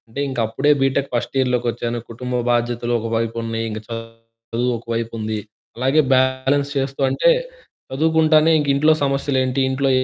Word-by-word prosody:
అంటే, 115 +5 -8
ఇంకప్పుడే 120 +3 +1
బీటెక్ 135 +1 +1
ఫస్టియర్‌లోకొచ్చాను. 120 -1 -1
కుటుంబ 125 +2 -5 0.2
బాధ్యతలు 120 0 0
ఒకవైపున్నయి. 115 0 -2
ఇంక 110 0 -5 0.8
చదువొకవైపుంది. 115 -2 -2 0.4
అలాగే 135 +5 +3
బ్యాలెన్స్ 130 +2 +2
చేస్తూ 135 +1 -2
అంటే, 135 - +3 0.6
చదువుకుంటానే 160 +2 +3
ఇంకింట్లో 145 +2 +3
సమస్యలేంటి, 135 -1 0
ఇంట్లో 135 +1 0
130 Hz, 100 wpm, -20 LUFS, 115-140 Hz, 0.8 s, అలాగే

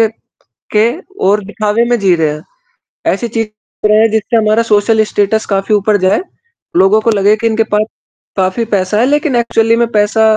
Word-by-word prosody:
के 225 - +4 0.6
के 220 +2 +3 0.4
और 205 +1 +2
दिखावे 210 +2 -1
में 240 - +2
जी 195 -3 +3
रहे 160 -2 0
हैं। 150 - -8 0.7
ऐसे 220 +5 -3
चीज़ 225 -1 -2 0.4
कर 215 +1 +4
जिससे 220 +2 0
हमारा 215 +1 +2
सोशल 220 0 +2
स्टेटस 205 +2 0
काफ़ी 195 +1 0
ऊपर 205 +1 +1
जाए। 185 +1 +1 0.6
लोगों 195 +4 +4
को 230 - +1
लगे 205 +1 +3
कि 230 - -1
इनके 225 0 +1
पास 210 - +3 0.6
काफ़ी 190 +5 0
पैसा 200 +1 0
है 240 - +3
लेक़िन 290 0 0
एक्चुअली 230 -1 +2
में 235 0 +1
पैसा 215 +1 +2
215 Hz, 180 wpm, -13 LUFS, 205-225 Hz, 0.7 s, के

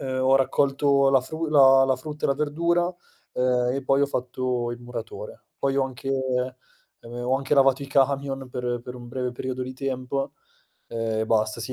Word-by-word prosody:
uhm, 130 -1 -2
ho 130 +1 +5
raccolto 140 +1 +2
la 135 -1 +5
fru 160 +5 -4
la 135 -3 +7
la 130 -1 +2
frutta 150 +3 -7
e - - +3
la 140 - +3
verdura, 170 +5 0 0.4
ehm, 125 -1 +1
e 135 - -3
poi 135 +1 +2
ho - - +3
fatto 125 -2 -2
il 120 - -6
muratore. 120 -2 -8
Poi 135 0 0
ho 135 - +3
anche 130 0 -5
ehm, 130 -1 -1 0.7
ho 130 +2 +2
anche 135 +1 0
lavato 135 -1 +4
i - - -6
camion 135 -1 0
per 125 -1 -2
per 125 - -7
un 120 -1 -10
breve 125 0 -3
periodo 130 +1 -4
di 130 +1 -5
tempo 135 0 -3 0.6
e 115 -1 -1
basta. 110 0 +1
Sì 115 +3 -5
130 Hz, 190 wpm, -25 LUFS, 125-140 Hz, 0.7 s, la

